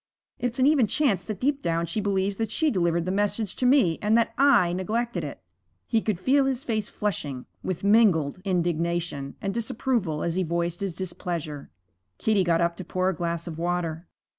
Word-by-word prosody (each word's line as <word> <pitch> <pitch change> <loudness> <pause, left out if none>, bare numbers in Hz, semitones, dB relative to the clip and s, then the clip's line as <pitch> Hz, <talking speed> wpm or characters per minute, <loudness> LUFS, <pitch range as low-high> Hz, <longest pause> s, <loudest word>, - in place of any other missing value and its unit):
It's 245 -1 -1
an 260 - +4
even 280 -6 +4
chance 205 - +1
that 215 -3 -5
deep 280 +2 0
down 170 0 0
she 170 +6 -2
believes 195 -1 0
that 225 -2 -1
she 310 +7 +1
delivered 170 -3 +1
the 185 - -1
message 205 +1 -1
to 250 - +2
me, 250 - +4
and 215 +2 +3
that 230 0 +1
I 240 -11 +4
neglected 210 +1 -2
it.' 145 -8 -7 0.4
He 225 - +1
could 210 -6 -1
feel 270 +6 +3
his 265 -1 -1
face 215 -3 -2
flushing 145 -11 -3 0.2
with 185 -1 -3
mingled 195 -7 +3
indignation 170 -5 -1
and 195 -1 -1
disapproval 225 - -1
as 170 - -1
he 185 - 0
voiced 170 0 -1
his 195 -4 -3
displeasure. 170 -5 -5 0.5
Kitty 210 -3 +2
got 170 -1 +2
up 170 0 0
to 185 - -6
pour 185 +1 0
a 190 - -2
glass 170 0 -2
of 165 -2 -6
water. 170 -1 -2
185 Hz, 190 wpm, -26 LUFS, 170-225 Hz, 0.5 s, an